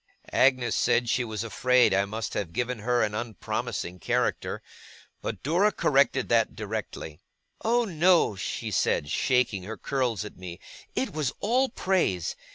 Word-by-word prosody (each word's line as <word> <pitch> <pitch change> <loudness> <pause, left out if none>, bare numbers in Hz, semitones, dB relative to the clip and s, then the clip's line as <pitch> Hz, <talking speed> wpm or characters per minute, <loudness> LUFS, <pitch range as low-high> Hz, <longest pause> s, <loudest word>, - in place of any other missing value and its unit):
Agnes 130 -2 +3
said 120 0 +2
she 125 - +2
was 110 -2 -4
afraid 125 +1 +3
I 100 +1 +3
must 110 +3 -4
have 85 -5 -3
given 120 +1 -2
her 120 +3 +1
an 105 - -1
unpromising 105 -5 -4
character; - - -1 0.6
but - - -5
Dora 180 +9 +3
corrected 135 -6 +2
that 115 -1 +2
directly. 105 -7 -5 0.4
'Oh 235 +2 +2
no!' 175 - +3
she 95 - -4
said, 70 - +1
shaking 125 -7 +1
her 110 +4 -7
curls 125 -8 -1
at - - -10
me; 90 -1 -8 0.4
'it 230 -8 -1
was 150 -5 -1
all 255 +5 +2
praise. 185 - 0
120 Hz, 150 wpm, -27 LUFS, 105-145 Hz, 0.6 s, Agnes